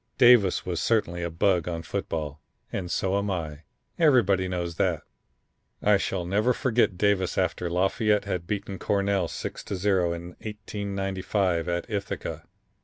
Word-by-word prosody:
Davis 120 -7 +6
was 90 -2 -2
certainly 90 -7 +1
a 85 - -2
bug 85 +1 +1
on 85 -1 -3
football 80 -5 -4 0.3
and 90 -3 -3
so 95 +2 +1
am 100 0 -2
I. 80 -5 -4 0.3
Everybody 110 - +4
knows 85 -2 -3
that. - - +1 0.8
"I 105 -1 +4
shall 90 -2 -2
never 105 +7 +2
forget 120 -8 +1
Davis 100 -2 +1
after 90 -1 0
Lafayette 100 +4 +1
had 90 -3 -3
beaten 100 -1 -3
Cornell 100 -3 +1
6 - - -6
to - - -3
0, 95 -2 +2
in 85 +1 -6
1895, 95 -4 -2
at 85 0 -2
Ithaca. 100 -3 -4
95 Hz, 145 wpm, -26 LUFS, 85-100 Hz, 0.8 s, Davis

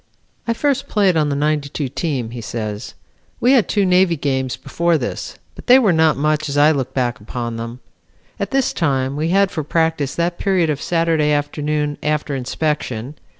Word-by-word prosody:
"I 230 - +2
first 280 +1 0
played 195 -4 +2
on 150 -2 +2
the 140 - -1
'92 145 -1 -1
team," 135 -5 -3
he 120 -1 -6
says. 110 -1 -5 0.4
"We 250 - +3
had 255 -6 +4
two 205 -2 +2
Navy 180 -2 +3
games 130 -3 -1
before 170 -1 0
this, - - -5 0.2
but - - -13
they 250 +1 +8
were 215 -9 +3
not 160 -2 +3
much 155 +1 0
as 140 - -2
I 150 +2 +6
look 135 -4 -2
back 120 -3 0
upon 115 +2 -5
them. 115 +2 -7 0.6
At - - -2
this 270 -2 +1
time 135 -4 0
we 155 +3 -1
had 195 +1 +3
for 155 - -3
practice 160 -2 0
that 170 +1 -1
period 185 -5 +2
of 145 - -4
Saturday 165 -3 +1
afternoon 150 0 -1
after 150 -1 -1
inspection. 130 -2 -2
150 Hz, 185 wpm, -19 LUFS, 135-170 Hz, 0.6 s, they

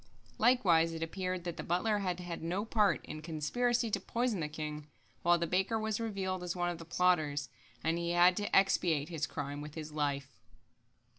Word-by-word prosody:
Likewise 180 -9 +4
it 165 0 -3
appeared 185 +1 -3
that 175 -2 -4
the - - -4
butler 205 +5 +1
had 180 -2 -2
had 175 -2 -5
no 180 +6 -2
part 215 -2 +2
in - - -6
the - - -8
conspiracy 230 +10 0
to 200 - +1
poison 230 +1 -1
the 155 - -1
king, 150 -1 -5 0.3
while 175 0 +4
the 170 - 0
baker 190 +6 +1
was 220 0 -1
revealed 195 -5 -2
as 180 0 -3
one 175 0 0
of 170 - -7
the 165 - -9
plotters, 160 -5 +1 0.3
and 165 +1 +1
he 170 0 -2
had 175 +1 +5
to 205 0 -1
expiate 170 -6 +3
his 160 -3 -2
crime 145 -1 -5
with 150 0 -8
his 155 -1 -6
life. 140 -3 -2
175 Hz, 200 wpm, -33 LUFS, 155-195 Hz, 0.3 s, had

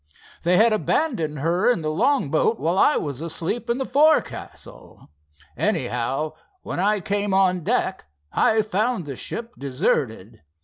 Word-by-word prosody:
They 180 +1 +3
had 225 +1 +5
abandoned 205 - 0
her 175 - +2
in 175 -10 -2
the 155 - -1
long 165 - +1
boat 220 +8 +1
while 170 +4 0
I 300 - +4
was 140 -2 -4
asleep 165 +8 -2
in 235 - +1
the 265 - -2
forecastle. 305 - -1 0.4
Anyhow, 135 +6 -1 0.3
when - - -4
I 205 +2 +2
came 200 +1 -1
on 185 -2 +2
deck, - - -1 0.3
I 220 0 +3
found 215 -1 -1
the 140 -2 -6
ship 235 - -6
deserted. 120 -5 -2
180 Hz, 145 wpm, -23 LUFS, 150-225 Hz, 0.4 s, had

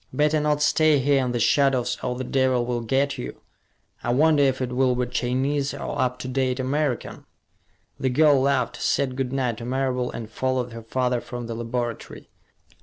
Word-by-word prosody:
"Better 150 +3 +2
not 150 0 +1
stay 155 0 +4
here 135 0 +2
in 125 - -1
the 120 - -1
shadows 130 +1 +2
or 125 -1 -1
the 130 - -3
devil 130 -1 +1
will 120 -1 -2
get 135 +5 0
you. 60 - -6 0.6
I 120 - 0
wonder 150 +3 +4
if 135 -2 +2
it 125 -1 -2
will 130 -1 +2
be 125 0 0
Chinese 135 +3 -1
or - - -3
up 125 0 0
to - - -5
date 130 0 -1
American!" 135 0 -2 0.7
The 130 - 0
girl 145 +1 +4
laughed, 135 -3 0
said 130 -2 0
good 130 -1 -2
night 125 -4 -1
to 115 - -6
Marable, 130 -1 -1
and 115 -2 -6
followed 130 +2 -2
her 115 - -7
father 125 +1 -1
from 120 -1 -7
the 115 - -5
laboratory. 120 0 -5
130 Hz, 185 wpm, -24 LUFS, 125-140 Hz, 0.7 s, stay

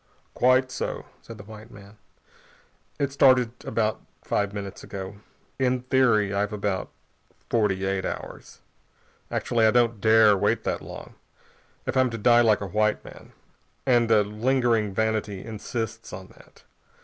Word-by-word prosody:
"Quite 130 +1 +3
so," - - -4 0.2
said 115 - -11
the 105 - -10
white 110 +2 -12
man. 100 +1 -15 1.0
"It 140 -2 -1
started 130 -4 +4
about 110 -1 -1 0.2
five 100 -1 -1
minutes 100 -1 -7
ago. 95 0 -7 0.4
In 130 -1 +1
theory, 120 -6 +2
I've 100 +1 -1
about 100 -3 -2 0.6
forty 100 -4 +1
eight 95 0 -1
hours. - - -7 0.7
Actually, 115 -2 +1
I - - +6
don't 115 -2 +2
dare 110 -1 +6
wait 95 - 0
that - - -2
long, - - -10 0.7
if - - -3
I'm 130 -1 +3
to 115 - -5
die 120 +2 +5
like 110 -3 +3
a - - -3
white 105 0 +1
man. - - -13 0.5
And 120 -3 +3
a 110 -2 +5
lingering 115 0 0
vanity 110 -1 -2
insists 115 +1 -5
on 95 0 -9
that. - - -20
110 Hz, 145 wpm, -25 LUFS, 105-120 Hz, 1.0 s, I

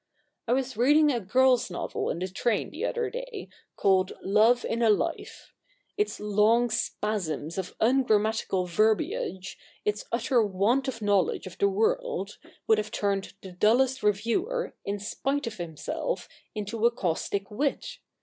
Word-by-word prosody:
I 235 - +2
was 260 -1 -1
reading 295 +6 +4
a 245 - 0
girl's 250 +4 +3
novel 175 - -3
in - - -2
the 185 +2 -2
train 215 +5 -1
the - - -4
other 470 -3 -2
day, - - -7 0.3
called 190 -1 +2
Love 220 +5 +4
in 230 - -2
a 230 - +4
Life, 210 - -2 0.4
Its 415 0 -1
long 215 +3 +3
spasms 170 -7 -2
of 185 - -6
ungrammatical 220 -6 +2
verbiage, 215 - 0 0.3
its 210 0 -1
utter 235 +1 +2
want 215 +7 +1
of 230 -4 -4
knowledge 205 - +1
of - - -10
the 400 - +4
world, 470 +4 -1 0.3
would 220 -1 +4
have 215 0 -3
turned 200 -2 -2
the 190 - -8
dullest 250 +8 +2
reviewer, 235 - 0
in 200 +1 -2
spite 275 +8 -2
of 225 -2 -5
himself, 175 - -4 0.3
into 215 +2 -4
a - - +4
caustic 195 0 -2
wit. 275 +7 -2
220 Hz, 150 wpm, -27 LUFS, 200-270 Hz, 0.4 s, reading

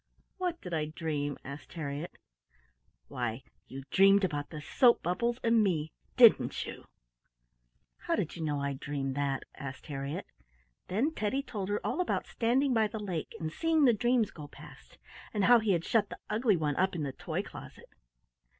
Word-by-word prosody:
"What 355 -2 -1
did 180 - -7
I 155 -2 0
dream?" 150 -3 -3
asked 140 +2 -9
Harriett. 150 0 -5 0.9
"Why, 120 0 -3 0.2
you 135 +1 -8
dreamed 195 +1 +6
about 145 -5 -1
the 155 - -7
soap 240 - +4
bubbles 235 +8 0
and 230 -1 +4
me; 160 -6 0 0.3
didn't 235 -3 +6
you?" - - -9 1.1
"How - - -1
did - - -2
you 170 - -7
know 150 -2 -1
I 140 0 -1
dreamed 135 -1 -3
that?" 140 -1 -1
asked 130 -1 -8
Harriett. 145 +5 -4 0.6
Then 245 - 0
Teddy 215 +4 -1
told 205 -7 -5
her 205 - 0
all - - 0
about 360 - -1
standing 255 +4 +1
by 220 -2 +3
the 215 - -6
lake 185 -7 -4
and 155 -1 -4
seeing 320 -3 +3
the 245 - +6
dreams 240 0 +2
go 150 -2 -9
past, - - -15 0.4
and 205 - +1
how 245 0 +7
he 215 -3 +2
had 170 -1 -1
shut 215 -3 +2
the - - -7
ugly 215 -2 +3
one 150 -3 -1
up 190 0 +1
in 160 - -2
the 135 -2 -3
toy - - -3
closet. - - -12
180 Hz, 180 wpm, -31 LUFS, 145-225 Hz, 1.1 s, how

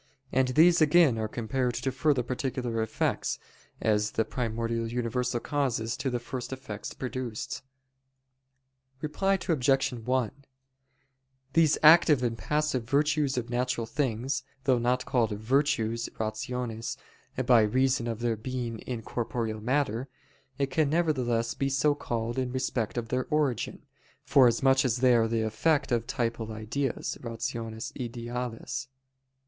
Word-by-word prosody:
And 130 0 +3
these 165 +6 +5
again 155 -6 +5
are 110 - -1
compared 120 +3 -1
to 135 - -1
further 135 0 +2
particular 125 -2 -2
effects, 110 - -1 0.4
as 105 -1 +2
the 110 - +1
primordial 115 -1 -2
universal 120 +1 -1
causes 120 -5 -1
to 135 - -1
the 125 - -1
first 120 +1 -6
effects 130 -6 -6
produced. 125 -3 -4 1.4
Reply 195 +6 +1
Obj. 135 -4 +2
1: 125 -1 0 1.2
These 160 -3 +4
active 155 -4 +7
and 115 -2 0
passive 150 -1 0
virtues 145 -1 +2
of 120 0 -3
natural 125 -1 0
things, 130 0 -1 0.2
though 130 -3 +3
not 125 +2 +1
called 120 -4 +1
"virtues" 115 -1 +1
(rationes) 115 +1 -3 0.5
by 120 -2 +6
reason 130 +3 +2
of 115 -1 -3
their 120 -1 +1
being 120 0 -4
in 120 -1 -5
corporeal 115 -2 -3
matter, 125 0 0 0.6
can 155 -1 +2
nevertheless 130 -8 +1
be 135 - -1
so 140 +2 +3
called 120 -3 -3
in 130 -1 -1
respect 130 -3 -2
of 115 -1 -3
their 125 0 -1
origin, 145 -6 0 0.4
forasmuch 130 +1 +4
as 125 -3 +1
they 125 0 +5
are 115 -1 +4
the 115 0 0
effect 135 +8 +1
of 120 -1 +1
the - - -4
typal 115 -2 -2
ideas 115 +5 -3
[rationes 115 -1 -4
ideales]. 120 0 -4
125 Hz, 130 wpm, -28 LUFS, 115-135 Hz, 1.4 s, active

